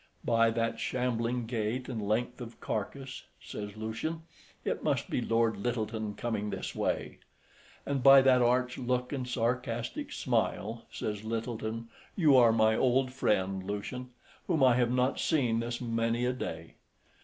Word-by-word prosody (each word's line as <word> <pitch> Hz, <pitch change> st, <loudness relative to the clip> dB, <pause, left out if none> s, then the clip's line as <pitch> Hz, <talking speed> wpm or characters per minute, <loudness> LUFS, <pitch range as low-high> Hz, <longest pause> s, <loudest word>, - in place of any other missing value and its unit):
"By 115 Hz, -1 st, +4 dB
that 115 Hz, 0 st, -1 dB
shambling 125 Hz, -1 st, -1 dB
gait 115 Hz, +2 st, -2 dB
and 120 Hz, -4 st, -4 dB
length 120 Hz, +4 st, -1 dB
of 120 Hz, -1 st, -9 dB
carcase," 130 Hz, +5 st, -4 dB
says 105 Hz, 0 st, -7 dB
Lucian, 110 Hz, +10 st, -4 dB, 0.4 s
"it -, -, -1 dB
must -, -, 0 dB
be -, -, 0 dB
Lord 115 Hz, -2 st, +1 dB
Lyttelton 110 Hz, -1 st, -2 dB
coming 110 Hz, -3 st, -2 dB
this -, -, -4 dB
way." -, -, -2 dB, 0.7 s
"And 140 Hz, -2 st, -1 dB
by 135 Hz, 0 st, +9 dB
that 130 Hz, -1 st, +5 dB
arch 125 Hz, +1 st, +2 dB
look 125 Hz, +1 st, -1 dB
and 130 Hz, -3 st, -3 dB
sarcastic 120 Hz, -1 st, -2 dB
smile," 115 Hz, +3 st, -1 dB
says 105 Hz, -1 st, -4 dB
Lyttelton, 115 Hz, 0 st, -4 dB, 0.3 s
"you 155 Hz, -7 st, +5 dB
are 120 Hz, -3 st, +7 dB
my 110 Hz, -1 st, +4 dB
old 130 Hz, +1 st, +2 dB
friend 95 Hz, -6 st, 0 dB
Lucian, 105 Hz, +6 st, -5 dB, 0.4 s
whom 150 Hz, -4 st, +2 dB
I 130 Hz, -2 st, +7 dB
have 120 Hz, -1 st, +3 dB
not 125 Hz, +1 st, +1 dB
seen 125 Hz, -8 st, +2 dB
this 120 Hz, +1 st, -3 dB
many 115 Hz, 0 st, 0 dB
a 125 Hz, -, +1 dB
day. 80 Hz, -9 st, -6 dB
120 Hz, 150 wpm, -30 LUFS, 110-125 Hz, 0.7 s, by